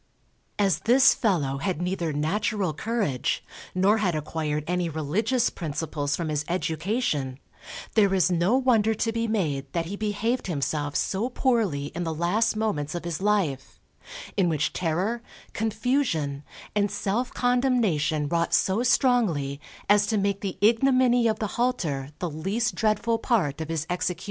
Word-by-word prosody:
As 200 -2 +2
this 255 +3 +5
fellow 150 - 0
had 185 0 -2
neither 180 -2 -1
natural 185 +4 -1
courage, 200 - -1 0.3
nor 200 +4 +3
had 185 -5 +1
acquired 150 0 -2
any 180 0 -1
religious 190 - 0
principles 150 -3 -3
from 165 -2 -3
his 150 -1 -1
education, 165 - -1 0.6
there 205 -3 +4
is 185 -1 +3
no 180 +8 +3
wonder 225 -4 +3
to 225 +2 0
be 230 0 -1
made 145 -11 -1
that 170 -1 -1
he 190 +5 -5
behaved 215 +4 -1
himself 145 -2 -2
so 210 +6 0
poorly 215 - 0
in 175 - -3
the 165 -1 -3
last 180 +8 +1
moments 190 -9 -2
of 175 - -4
his 170 0 -3
life; 190 -11 0 0.6
in 185 -3 +2
which 155 -2 0
terror, 185 +8 -1 0.3
confusion, 220 - 0 0.3
and 205 -1 +2
self 225 +7 -2
condemnation 235 - +1
wrought 170 +2 +1
so 195 +4 +2
strongly 215 - +2 0.3
as 205 0 +4
to 220 0 +1
make 200 0 0
the 195 -3 -4
ignominy 245 +2 +4
of 220 -1 +1
the 215 - -2 0.2
halter 155 - -1
the 180 - -2
least 195 +9 -1
dreadful 225 +1 +1
part 170 - 0
of 160 - -5
his 160 -2 -2
execution. 180 -1 -2
190 Hz, 150 wpm, -26 LUFS, 155-225 Hz, 0.6 s, this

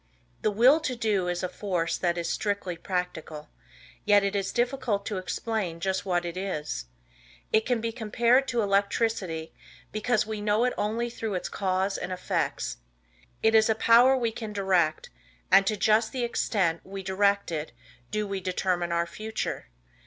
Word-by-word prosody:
The - - +2
Will 245 +9 +5
To 260 -5 -2
Do 210 -6 0
is 175 +1 -2
a - - +1
force 180 -3 -2
that 175 -1 0
is 170 - -2
strictly 200 -4 -2
practical, 165 -4 -4 0.5
yet 205 -1 +5
it 200 +1 -1
is 195 -1 -1
difficult 240 -4 0
to 205 -3 -2
explain 185 -3 -3
just 190 +2 -2
what 175 -1 +1
it 170 0 -4
is. 150 - -3 0.7
It 220 0 +3
can 245 -3 +1
be 230 0 -2
compared 235 +3 +2
to 235 -2 0
electricity 200 -4 0 0.4
because 215 +1 +1
we 215 -1 -4
know 210 +2 +2
it 250 - +1
only 230 +3 -1
through 220 -4 -4
its 180 - -3
cause 190 0 -1
and 180 - -5
effects. 120 - -2 0.7
It 220 - +4
is 220 0 +5
a 220 - +3
power 240 +4 +6
we 235 -3 0
can 220 -1 -6
direct 185 -6 +1 0.4
and 195 - +6
to 215 - +1
just 220 +3 +3
the 255 -2 -2
extent 190 -7 0
we 195 0 -7
direct 200 0 +1
it 155 -3 -3 0.4
do 215 0 -1
we 195 -1 -3
determine 180 -1 -1
our 170 0 +1
future. 215 - -4
200 Hz, 170 wpm, -27 LUFS, 180-220 Hz, 0.7 s, power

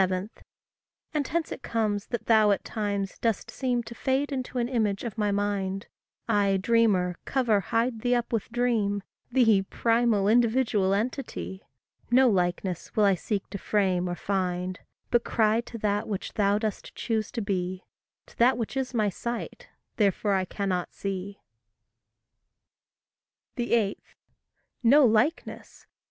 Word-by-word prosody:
And 295 -3 0
hence 330 +2 -2
it - - -6
comes 210 -3 -1
that 235 -3 -4
thou 220 -2 +5
at 200 - +1
times 200 -3 -3
dost 225 -4 -1
seem 250 -2 -1
To 235 - -9
fade 265 +4 0
into 255 -1 -4
an 240 -1 +1
image 215 -6 0
of 235 -4 -5
my 210 -2 0
mind; 200 -1 -1 0.4
I, 200 -3 +3
dreamer, 190 -4 +2
cover, 240 -6 +2
hide 230 +3 -1
thee 245 +1 +2
up 240 0 -2
with 225 +1 -2
dream, 225 -5 0 0.3
Thee, 225 -6 +4
primal, 225 0 +1
individual 225 -4 +3
entity! 200 - -4 0.5
No 255 +2 +5
likeness 180 -3 -1
will 215 - +3
I 200 -1 +5
seek 195 +2 -3
to 200 - -5
frame 185 -4 +1
or 175 - -2
find, 180 -1 -2 0.3
But 240 -1 +3
cry 220 0 +2
to 235 0 -9
that 210 0 -1
which 200 -3 -4
thou 200 -1 +2
dost 215 -1 -4
choose 220 -2 -2
to 235 - -2
be, 185 -2 -2 0.4
To - - -20
that 245 +1 +5
which 230 +2 -4
is 265 -2 -2
my 215 -2 +2
sight, 240 - -5 0.3
therefore 205 -1 +2
I 190 -1 +1
cannot 185 -2 -3
see. 195 0 -5 2.1
8. 235 -4 +1 0.8
No 270 +4 +6
likeness? 235 +9 0
215 Hz, 145 wpm, -27 LUFS, 195-240 Hz, 2.1 s, No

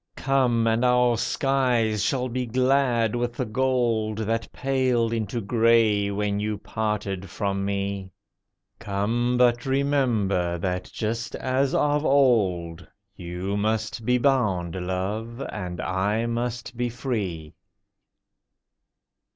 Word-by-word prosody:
Come! 130 -4 +2
and 115 +1 +2
our 125 -1 +4
skies 120 -4 +1
shall 130 +2 0
be 125 0 -3
glad 125 -2 +2
with 120 0 -1
the - - -2
gold 115 -2 0
That 115 +1 -2
paled 130 -4 0
into 115 +1 -2
gray 110 -2 +3
when 100 0 -1
you 105 0 -2
parted 105 -3 -3
from 100 0 -2
me. 100 -1 -3 0.7
Come! 115 +4 0
but 125 0 +3
remember 120 -11 +1
that, 90 +1 -3
just 115 0 -3
as 130 +1 0
of 145 0 +2
old, 95 - +2 0.3
You 90 +3 -4
must 110 +2 -1
be 125 +3 +2
bound, 105 -11 +1
Love, 95 +6 -3
and 90 -3 -5
I 100 +5 0
must 120 +1 -3
be 120 +1 -1
free. 100 - -4
115 Hz, 115 wpm, -25 LUFS, 100-125 Hz, 0.7 s, our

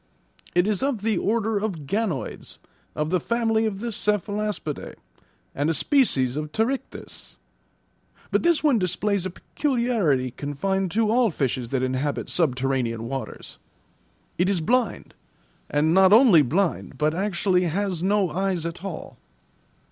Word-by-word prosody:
"It 175 +1 +4
is 210 -2 0
of 265 -7 -1
the 220 -1 +1
order 220 0 0
of 190 -8 -4
ganoids, 195 -3 -3 0.4
of 150 +1 -2
the 185 - +2
family 225 +1 +1
of 200 -2 -4
the 235 0 -3
cephalaspidae; 210 -5 -2 0.6
and 145 +3 0
a 165 - +1
species 140 - +2
of 150 0 -4
pterichthys. 245 - -4 0.9
But - - +2
this 340 -2 +2
one 280 -7 +4
displays 190 +1 0
a - - -5
peculiarity 215 - 0
confined 185 +9 -2
to 220 0 +2
all 240 0 +3
fishes 130 -7 -2
that 130 -1 -1
inhabit 130 +3 -2
subterranean 130 -6 0
waters. 135 +1 -6 0.8
It 180 +2 +3
is 195 -3 +1
blind, 235 +4 0 0.6
and 150 +2 +2
not 190 +1 +6
only 215 - +7
blind, 165 +8 -1
but 155 0 +1
actually 185 0 +1
has 180 0 -1
no 195 -2 +1
eyes 185 -1 -1
at 170 +2 -6
all." 190 -5 -7
190 Hz, 140 wpm, -24 LUFS, 150-215 Hz, 0.9 s, only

